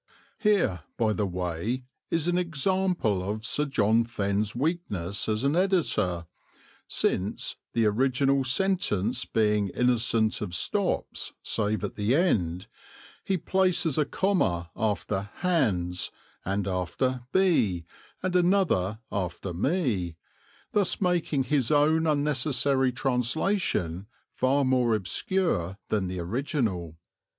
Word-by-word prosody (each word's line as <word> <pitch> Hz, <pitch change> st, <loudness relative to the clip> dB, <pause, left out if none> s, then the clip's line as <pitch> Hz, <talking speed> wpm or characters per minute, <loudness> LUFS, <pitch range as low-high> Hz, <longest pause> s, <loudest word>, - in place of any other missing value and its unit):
(Here, 200 Hz, -, +2 dB, 0.2 s
by 110 Hz, -2 st, +2 dB
the 105 Hz, -1 st, -1 dB
way, 90 Hz, +7 st, -3 dB, 0.3 s
is 165 Hz, 0 st, 0 dB
an 175 Hz, -, +2 dB
example 175 Hz, -, 0 dB
of 105 Hz, +4 st, -4 dB
Sir 150 Hz, +3 st, 0 dB
John 115 Hz, -4 st, +2 dB
Fenn's 105 Hz, -2 st, -1 dB
weakness 115 Hz, -, -2 dB
as 110 Hz, +2 st, 0 dB
an 140 Hz, +3 st, +2 dB
editor, 150 Hz, -, +1 dB, 0.6 s
since, 95 Hz, +3 st, -1 dB, 0.2 s
the 115 Hz, -1 st, +2 dB
original 135 Hz, +5 st, +2 dB
sentence 130 Hz, -, +1 dB
being 105 Hz, -2 st, +1 dB
innocent 115 Hz, 0 st, +1 dB
of 90 Hz, -, -3 dB
stops -, -, -1 dB
save 105 Hz, -1 st, -1 dB
at 105 Hz, -, -4 dB
the 105 Hz, +5 st, +2 dB
end, 90 Hz, -, +1 dB, 0.6 s
he 190 Hz, -, 0 dB
places 180 Hz, -4 st, +1 dB
a 150 Hz, -, +3 dB
comma 90 Hz, -, 0 dB
after 100 Hz, -2 st, -1 dB
"hands," 100 Hz, -, 0 dB, 0.3 s
and 100 Hz, 0 st, -1 dB
after 95 Hz, +8 st, -1 dB
"be" 115 Hz, -, +2 dB, 0.4 s
and 185 Hz, -1 st, -1 dB
another 175 Hz, -, +2 dB
after 90 Hz, -1 st, -3 dB
"me," 105 Hz, -, 0 dB, 0.6 s
thus 200 Hz, -4 st, +1 dB
making 175 Hz, -7 st, +1 dB
his 130 Hz, -2 st, +1 dB
own 155 Hz, +2 st, +3 dB
unnecessary 140 Hz, -2 st, +2 dB
translation 125 Hz, -, 0 dB, 0.3 s
far 135 Hz, +2 st, +2 dB
more 125 Hz, -3 st, +3 dB
obscure 95 Hz, -, 0 dB
than 105 Hz, -3 st, 0 dB
the 90 Hz, 0 st, -4 dB
original.) 95 Hz, -, -2 dB
120 Hz, 115 wpm, -27 LUFS, 100-155 Hz, 0.6 s, a